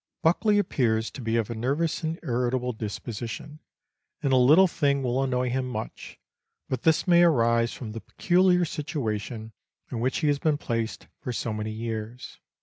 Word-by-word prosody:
Buckley 205 +6 +3
appears 115 - +1
to 135 - -8
be 115 -1 -1
of 115 -1 -1
a - - -4
nervous 140 +8 -1
and 160 0 -3
irritable 125 0 -1
disposition, 115 +6 -6 0.6
and 135 -2 +2
a - - +6
little 145 +9 +7
thing 140 -5 +1
will 125 +1 0
annoy 125 -2 0
him 130 0 -1
much, 110 -3 -6 0.5
but 130 -2 -2
this 160 +3 +2
may 175 -1 +6
arise 115 -8 +3
from 110 -4 -7
the 115 +1 -7
peculiar 180 0 +2
situation 115 -7 -4 0.4
in 120 - -3
which 125 +3 0
he 155 - +2
has 145 -1 +1
been 155 -1 +1
placed 115 -5 -3
for 130 - -4
so 115 -1 -2
many 105 0 -3
years. 110 +2 -6
125 Hz, 170 wpm, -26 LUFS, 115-150 Hz, 0.6 s, little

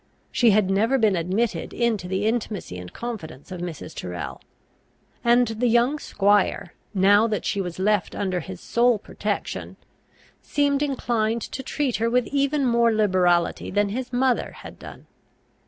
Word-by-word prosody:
She 240 - +4
had 205 -2 +3
never 225 +7 +2
been 215 -5 +3
admitted 185 +2 -1
into 225 -6 0
the 190 +2 -1
intimacy 215 - -2
and 90 0 -9
confidence 195 - -7
of 180 -2 -6
Mrs. 165 -2 -6
Tyrrel; 90 -1 -6 0.8
and 240 0 +4
the 225 +2 0
young 240 +6 +3
squire, 200 -6 +1 0.2
now 205 +3 +5
that 215 -2 -2
she 200 - 0
was 175 -3 -5
left 205 +1 +1
under 185 -2 -1
his 185 +1 -8
sole 240 +3 +2
protection, 205 - -4 0.6
seemed 285 -1 +1
inclined 235 -5 0
to 265 - -5
treat 265 -1 -1
her 230 +1 +1
with 250 +1 +2
even 280 0 +1
more 235 -1 +3
liberality 185 -5 +2
than 205 +1 +1
his 250 +4 -4
mother 250 0 +1
had - - -11
done. - - -11
215 Hz, 155 wpm, -24 LUFS, 190-240 Hz, 0.8 s, now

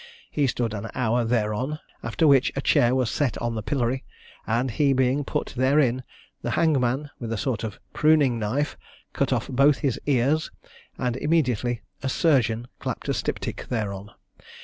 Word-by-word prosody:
He 145 -2 +1
stood 120 -2 -1
an 105 +1 -5
hour 120 -1 +1
thereon; 115 +5 0 0.2
after 160 - +1
which 135 -2 +5
a 135 - -1
chair 125 -1 +3
was 125 -4 +1
set 140 -6 0
on 120 -1 -2
the 110 - -3
pillory; 125 +3 -1 0.4
and 120 +3 +1
he 140 +3 +2
being 130 +2 +2
put - - -3
therein, 130 -1 +3 0.4
the - - -3
hangman 145 -2 +1
with 115 -2 -5
a 115 - -1
sort 120 -1 -2
of 110 -2 -5
pruning 150 -6 +3
knife 125 +8 -1 0.4
cut - - 0
off - - 0
both 140 +2 +4
his 130 -5 0
ears, 140 +3 +2 0.5
and 125 -1 -1
immediately 125 -6 0 0.2
a 135 - -1
surgeon 120 -6 +2
clapped - - -4
a - - +2
styptic - - -3
thereon. 105 -4 -3
125 Hz, 165 wpm, -25 LUFS, 115-140 Hz, 0.5 s, which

